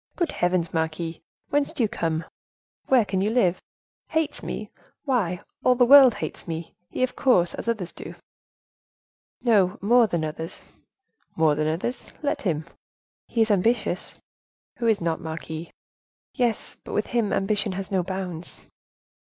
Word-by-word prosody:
"Good 345 -4 0
heavens! 175 -1 0
marquise, 160 0 -2 0.3
whence 290 0 +1
do 245 - 0
you - - +3
come? 165 -4 -2 0.6
where 250 -5 +5
can 190 -2 -1
you 205 - +2
live? 190 -7 +2 0.5
Hates 320 -2 -1
me! - - -5 0.3
why 205 - 0 0.2
all 250 - +5
the 245 0 +5
world 265 -2 +9
hates - - -6
me, 165 0 -5 0.2
he, - - -1
of 255 - 0
course, 185 -10 +3
as - - -6
others 215 -7 -1
do." - - -9 1.3
"He 240 - +2 0.3
more 235 +3 +5
than 170 -5 -1
others." 160 +3 -6 0.7
"More 160 -2 +4
than 155 +1 0
others—let 240 - -3
him." 160 -6 -1 0.6
"He 230 - 0
is 220 - 0
ambitious." 225 +5 +1 0.6
"Who 235 - -1
is 220 -4 +3
not, 165 0 -1
marquise." 160 0 -6 0.6
"Yes, 240 -4 -1
but - - -8
with 210 - +1
him 230 -4 0
ambition 200 0 0
has 195 +1 -5
no 190 -2 +2
bounds." 180 -2 -5
190 Hz, 150 wpm, -25 LUFS, 165-240 Hz, 1.3 s, world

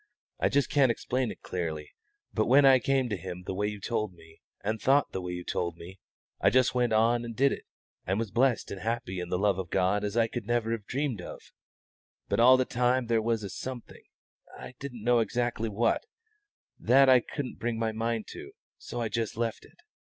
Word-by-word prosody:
I - - 0
can't - - -12
just 140 0 +1
explain 130 -2 +2
it - - -9
clearly, 80 -4 -4 0.4
but 110 - +1
when 140 +3 +6
I 135 -1 +7
came 135 0 +1
to 105 - -1
Him 90 0 -7
the 95 - -4
way 105 +2 -1
you 105 -1 -5
told 110 -1 -2
me, 80 -1 -18 0.2
and 110 +2 -2
thought 140 +1 +3
the 95 - -4
way 90 0 -5
you 90 0 -5
told 85 -1 -3
me, 90 +3 -11 0.4
I - - +4
just 130 +3 +3
went 125 -2 +1
on 115 +2 +3
and 115 -1 -6
did 135 +4 +3
it - - -5 0.4
and 95 +2 +1
was 110 -3 -3
blessed 125 -1 +1
and 95 - -6
happy 115 -2 -3
in 90 -1 -5
the 90 - 0
love 100 0 +1
of 90 -3 -5
God 95 +4 +1
as 105 +2 -2
I 115 -1 +4 0.2
never 120 +1 0
could 115 - -1
have 100 - -29
dreamed 130 -7 -2
of; - - -8 0.9
but - - 0
all 130 +2 +7
the 130 - +1
time 125 +1 +1
there 115 -1 +1
was 115 -1 -1
a 100 - -5
something 130 -2 -7 0.6
I - - -9
didn't 125 -6 -7
know 120 0 +4
exactly 115 0 -1
what 115 - 0 0.7
that 135 +2 +5
I 130 -1 +7
couldn't 130 +2 -6
bring 115 0 -2
my 115 0 0
mind 115 0 -2
to; - - -9 0.3
so - - -6
I 115 - 0
just 115 -1 -3
left 115 -2 -2
it. - - -21
115 Hz, 220 wpm, -28 LUFS, 100-125 Hz, 0.9 s, I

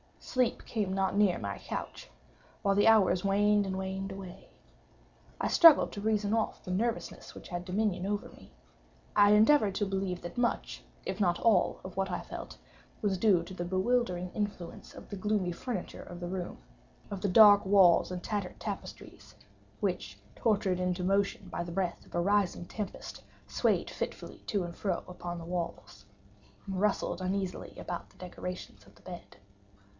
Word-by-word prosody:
Sleep 255 -2 -1
came 205 -5 -2
not 195 0 0
near 200 -3 +4
my 100 -1 -4
couch—while 200 - -5
the 205 - +4
hours 200 -5 +5
waned 205 +1 +3
and 190 -1 -3
waned 190 +1 -4
away. 190 -1 -9 0.9
I - - 0
struggled 330 -3 +7
to 200 - -6
reason 210 -1 +1
off 225 -1 -1
the 180 - -5
nervousness 230 +5 -2
which - - -11
had 175 -1 -4
dominion 190 -1 0
over 205 +1 -2
me. - - -16 0.6
I 205 0 +7
endeavored 215 -2 +5
to 205 - +1
believe 190 -2 -2
that 175 +5 -8
much, 240 -1 -1 0.2
if - - -3
not 175 -4 +2
all 215 -6 +3
of 185 0 -9
what 195 0 0
I 180 - -2
felt, - - -8 0.4
was 200 -4 +1
due 185 -3 +4
to 190 - -9
the 175 -1 -4
bewildering 185 -1 0
influence 205 -5 -5
of - - -12
the 205 - -5
gloomy 200 -2 0
furniture 200 +1 -5
of 175 - -9
the 175 - -4
room—of 185 +1 -8
the 200 - 0
dark 205 +1 +8
and 180 -2 +4
tattered 205 -4 -3
draperies, - - -8 0.5
which, - - -2 0.2
tortured 200 -5 +1
into 180 0 -1
motion 195 0 +1
by 175 - -3
the 170 - -7
breath 180 0 -2
of - - -11
a 175 - +2
rising 195 -2 +1
tempest, 210 +2 -6 0.2
swayed - - +1
fitfully - - -6
to 200 -3 0
and 170 -1 -6
fro 185 -4 -2
upon 175 -1 -6
the 165 - -8
walls, 170 - -5 0.6
and 190 -2 -3
rustled 205 -1 0
uneasily 185 0 -3
about 175 - -5
the - - -24
decorations 180 0 -7
of - - -20
the - - -21
bed. 175 - -10
195 Hz, 165 wpm, -31 LUFS, 180-205 Hz, 0.9 s, dark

